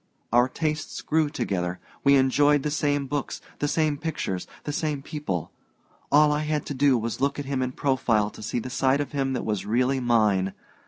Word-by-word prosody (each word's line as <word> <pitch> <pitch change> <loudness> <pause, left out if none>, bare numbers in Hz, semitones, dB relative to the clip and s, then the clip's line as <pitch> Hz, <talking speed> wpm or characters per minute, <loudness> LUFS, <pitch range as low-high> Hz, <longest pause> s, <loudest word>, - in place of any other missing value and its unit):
Our 120 +2 +5
tastes 155 +1 -3
grew 155 -1 +2
together 90 - -2 0.3
we 140 0 +6
enjoyed 140 +2 +4
the 150 - -1
same 145 -1 0
books, 140 +1 -3 0.2
the 145 - 0
same 150 -1 +1
pictures, 150 - -3 0.2
the 145 - -4
same 150 -4 -2
people. 145 - -4 0.6
All 150 +1 +6
I 150 - +1
had 150 -1 -1
to - - -4
do 135 -1 +3
was 115 -1 -3
to 130 - -4
look 140 0 +1
at 145 - -4
him 135 -1 -1
in 130 0 -2
profile 115 -7 +1
to - - -12
see 110 - -3
the 125 +2 -4
side 135 +2 +2
of 145 - -3
him 135 -2 -1
that 125 - -3
was 105 -3 -1
really 125 +5 +1
mine. 105 -6 +2
135 Hz, 205 wpm, -25 LUFS, 120-145 Hz, 0.6 s, we